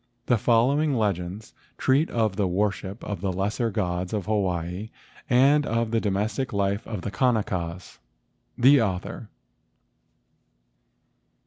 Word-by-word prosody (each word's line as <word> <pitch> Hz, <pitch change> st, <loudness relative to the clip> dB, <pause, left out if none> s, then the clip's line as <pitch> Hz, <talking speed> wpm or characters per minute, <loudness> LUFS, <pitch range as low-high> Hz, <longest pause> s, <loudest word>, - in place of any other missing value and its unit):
The 120 Hz, -, +2 dB
following 135 Hz, +7 st, +3 dB
legends 100 Hz, -1 st, -2 dB, 0.2 s
treat 140 Hz, +5 st, +2 dB
of 110 Hz, -4 st, 0 dB
the 100 Hz, -2 st, +1 dB
worship 100 Hz, +2 st, -2 dB
of 100 Hz, -4 st, -5 dB
the 95 Hz, -1 st, -1 dB
lesser 105 Hz, +6 st, -1 dB
gods 90 Hz, -3 st, -2 dB
of 105 Hz, -4 st, -2 dB
Hawaii 95 Hz, -1 st, -2 dB, 0.4 s
and 140 Hz, +4 st, +5 dB
of 115 Hz, -4 st, -1 dB
the 115 Hz, -1 st, +1 dB
do¬ 105 Hz, -, 0 dB
mestic 110 Hz, +7 st, -1 dB
life 100 Hz, 0 st, -1 dB
of 105 Hz, -5 st, -4 dB
the 100 Hz, -, -4 dB
Kanakas. 95 Hz, -9 st, -1 dB, 0.6 s
The 135 Hz, +2 st, +6 dB
Author. 100 Hz, +2 st, -3 dB
105 Hz, 125 wpm, -25 LUFS, 95-115 Hz, 0.6 s, The